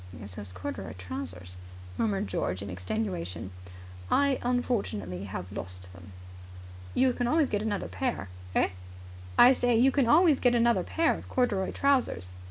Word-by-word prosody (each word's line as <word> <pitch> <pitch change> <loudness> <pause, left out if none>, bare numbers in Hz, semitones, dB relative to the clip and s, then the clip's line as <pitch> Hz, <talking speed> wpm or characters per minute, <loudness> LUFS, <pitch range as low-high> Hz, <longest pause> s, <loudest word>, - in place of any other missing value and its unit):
"It's 100 -2 -9
those 100 -1 -7
corduroy 90 -1 -6
trousers," 90 -1 -7 0.4
murmured 205 -2 0
George 90 +2 -2
in 100 - -6
extenuation. 90 - -3 0.6
"I 280 - +4
have 270 - -1
unfortunately 110 - -1 0.2
lost 90 -2 -8
them." 95 +1 -13 0.8
"You 260 -1 +4
can 245 -1 -1
always 305 +1 +2
get 205 - 0
another 210 -2 -2
pair." 245 - -2 0.3
"Eh?" - - +3 0.7
"I 250 - +9
say 245 -2 +2
you 260 +4 +5
can 265 -3 +2
always 310 +1 +5
get 245 -1 +3
another 235 0 +3
pair 325 0 +1
of - - -9
corduroy 210 -7 +1
trousers." 255 - +1
200 Hz, 150 wpm, -29 LUFS, -, 0.8 s, I